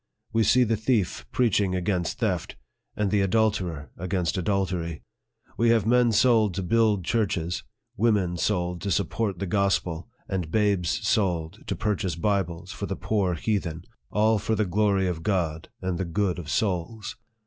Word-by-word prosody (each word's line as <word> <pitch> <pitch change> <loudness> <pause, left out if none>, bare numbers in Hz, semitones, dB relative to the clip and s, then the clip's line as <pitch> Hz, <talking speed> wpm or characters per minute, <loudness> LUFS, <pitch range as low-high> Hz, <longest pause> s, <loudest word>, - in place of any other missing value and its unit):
We 115 - +3
see 125 +4 +5
the 115 -2 +1
thief 110 - 0
preaching 100 -6 +2
against 90 -2 -1
theft, - - -1 0.4
and 105 -2 0
the 105 -1 +3
adulterer 95 -7 0
against 90 -2 -1
adultery. 90 -3 -1 0.5
We 115 0 +3
have 115 -3 +3
men 120 0 +4
sold 110 -4 +4
to 95 - -2
build 105 -2 +2
churches, 90 -6 0 0.4
women 100 -5 +2
sold 90 -2 -1
to 100 - -2
support 100 +2 0
the 100 - -3
gospel, 95 -1 0 0.2
and 90 -5 -2
babes 100 -3 +1
sold 90 -1 0
to - - -1
purchase 95 -5 -1
Bibles 90 -2 -1
for - - -5
the - - -3
poor 95 -5 0
heathen 85 -3 -2
I - - -32 0.3
all 110 0 +4
for 110 +2 0
the 110 0 +1
glory 100 0 +2
of 85 -3 -3
God 85 -5 -1
and 90 -2 -1
the 95 - -1
good 90 +1 -1
of 75 -4 -7
souls 100 +2 -1
95 Hz, 160 wpm, -26 LUFS, 90-110 Hz, 0.5 s, see